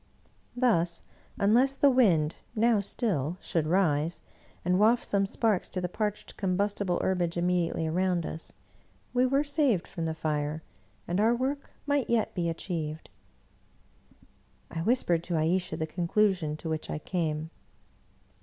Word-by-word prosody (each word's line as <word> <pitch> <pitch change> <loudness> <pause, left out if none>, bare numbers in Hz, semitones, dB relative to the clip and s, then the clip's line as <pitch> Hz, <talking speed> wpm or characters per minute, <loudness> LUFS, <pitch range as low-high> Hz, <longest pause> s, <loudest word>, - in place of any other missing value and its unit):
Thus, 195 -10 +1 0.3
unless 245 +7 +3
the 280 - +5
wind, 175 -12 +3 0.2
now 225 0 +3
still, 180 - -1
should 160 -5 -1
rise, 165 -2 +1 0.5
and 180 +1 +2
waft 230 +3 +4
some 195 -1 +1
sparks 210 -2 0
to 185 - -3
the 180 - -1
parched 210 +3 -4
combustible 195 -1 0
herbage 175 -2 0
immediately 175 -2 0
around 175 +1 0
us, 160 - -7 0.6
we 250 +1 +3
were 275 +3 +2
saved 285 - +1
from 165 -3 -4
the 160 - -2
fire, 155 0 -2 0.4
and 175 +3 0
our 225 +3 +4
work 270 +3 -2 0.2
might 285 -3 0
yet 230 -2 +1
be 170 -2 -1
achieved. 160 -2 -4 1.6
I 165 - -3
whispered 175 -5 +1
to 175 - -2
Ayesha 170 +1 0
the 160 - -1
conclusion 175 -1 0
to 165 - -7
which 155 -1 -3
I - - -2
came. 160 -1 -2
180 Hz, 140 wpm, -29 LUFS, 165-220 Hz, 1.6 s, the